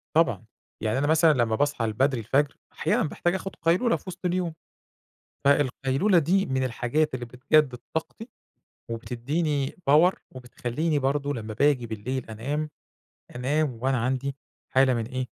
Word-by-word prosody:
طبعًا 115 - +2 0.4
يعني 110 +3 0
أنا 145 +2 +1
مثلًا 160 0 +5
لمّا 120 -5 +1
باصحى 145 -3 0
البدْري 130 +4 +1
الفجر 140 +6 +1 0.2
أحيانًا - - +1
باحتاج 175 +3 -1
آخد 195 0 -5
قَيْلُولَة 180 +9 +2
في - - -8
وسْط 185 0 -8
اليوم، 180 -2 0 0.9
فالقَيْلُولَة 140 +6 +3
دي 185 +5 +2
من 130 0 0
الحاجات 130 +5 0
اللي 125 -1 -4
بتجدِّد 125 +2 +2 0.2
طاقتي 215 +8 -4 0.6
وبِتدّيني 135 +5 -1 0.2
power 165 +6 +6 0.2
وبتخليني 130 +5 -2
برضو 140 +1 0
لمّا 110 -4 -5
باجي 135 0 +2
بالليل 115 +4 -4
أنام، 145 +8 -3 0.7
أنام 135 0 0
وأنا 135 0 +2
عندي 130 +3 -1 0.3
حالة 130 -1 +4
من 115 -2 -2
إيه، 130 +1 -3
135 Hz, 140 wpm, -26 LUFS, 125-155 Hz, 0.9 s, power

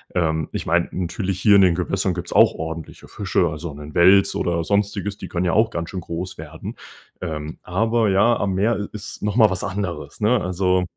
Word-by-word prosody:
ähm, 80 -3 0
ich - - -3
meine - - +1
natürlich 95 +1 -3
hier 105 0 +5
in - - +6
den 90 -3 +4
Gewässern 90 +1 -1
gibt's 90 0 -5
auch - - +5
ordentliche 80 0 -7
Fische. 95 -3 0
Also 80 +1 -6
‘nen 75 +1 -10
Wels 95 +3 +5
oder 85 -1 0
sonstiges, 100 +1 -1
die - - -7
können 90 0 -2
ja 85 - +1
auch 110 +2 +3
ganz 85 -6 -5
schön 95 - -4
groß 85 +2 -6
werden. 80 0 -8 0.5
Ähm, 80 -3 -5
aber 110 +4 +1
ja, 105 +5 +4
am 100 -1 -1
Meer 105 +3 +1
i 100 - -3
ist 105 0 -7
noch 105 0 -1
mal 110 -4 +5
was 95 +1 -2
anderes, 90 -7 -4
ne? 110 +2 +2
Also. 90 0 +1
95 Hz, 210 wpm, -22 LUFS, 85-100 Hz, 0.5 s, in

